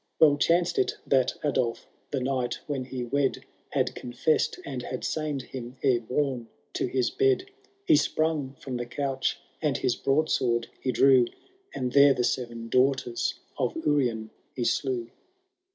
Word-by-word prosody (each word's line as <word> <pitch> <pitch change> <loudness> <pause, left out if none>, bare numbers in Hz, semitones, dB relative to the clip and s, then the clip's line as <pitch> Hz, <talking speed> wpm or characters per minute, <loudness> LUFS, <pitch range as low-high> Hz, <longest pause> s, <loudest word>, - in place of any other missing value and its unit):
Well 150 -3 +7
chanced 170 +3 +2
it - - +1
that 130 -2 +2
Adolf 130 -5 0 0.2
the 140 - -1
night 130 -1 -1
when 135 -4 -3
he 125 -1 -4
wed 135 +2 0 0.2
Had - - 0
confessed 125 +5 0
and 135 -3 -4
had 125 +1 -5
sained 150 -4 -2
him 125 0 -8
ere 130 -4 +4
boune 125 0 -1 0.3
to - - -1
his 125 -1 0
bed; 400 -1 +1 0.3
He 320 - +6
sprung 155 - 0
from 130 -2 -4
the 120 0 -4
couch 135 +1 -1 0.2
and - - +1
his - - +1
broadsword 130 -5 +1
he 130 - -1
drew. 130 -2 +5 0.5
And 125 -1 -2
there 140 0 +7
the 125 - 0
seven 120 -2 -2
daughters 130 -1 +1 0.2
of - - 0
Urien 120 -7 +1 0.2
he 125 - -2
slew. 120 -1 -1
130 Hz, 150 wpm, -27 LUFS, 120-145 Hz, 0.5 s, Well